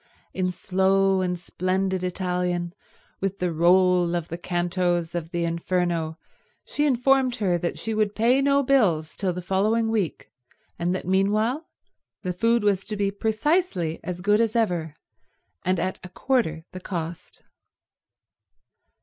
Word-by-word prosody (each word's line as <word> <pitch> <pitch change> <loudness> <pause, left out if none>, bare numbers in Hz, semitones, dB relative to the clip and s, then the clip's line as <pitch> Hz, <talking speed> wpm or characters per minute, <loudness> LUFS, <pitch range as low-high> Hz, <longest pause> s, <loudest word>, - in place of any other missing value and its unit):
In 185 -1 0
slow 190 +1 +2
and 180 -1 -1
splendid 185 +2 -1
Italian, 180 -1 -1 0.5
with 195 0 -2
the 180 -3 -1
roll 175 +1 +4
of 170 -2 -3
the 170 - -4
cantos 175 -1 -1
of 170 -2 -4
the 170 0 -1
Inferno, 170 -1 -1 0.5
she 295 0 0
informed 260 -1 +3
her 185 -7 0
that 170 - -3
she 225 - -3
would 215 -1 0
pay 245 +5 +3
no 280 0 +3
bills 185 - +2
till 190 -2 -1
the 180 0 -6
following 215 +5 +1
week, 205 -8 -2 0.5
and 175 +2 0
that - - -5
meanwhile 215 - +1 0.6
the 180 -1 -2
food 230 +4 +2
was 200 -2 +2
to 215 -1 -4
be 200 -1 +1
precisely 220 - 0
as 180 0 -5
good 205 +3 +3
as 225 0 0
ever, 175 -9 0 0.7
and 185 -1 +1
at 185 +2 -2
a 180 - -8
quarter 180 -7 -1
the 185 - -7
cost. 170 -3 -6
185 Hz, 145 wpm, -25 LUFS, 175-215 Hz, 0.7 s, roll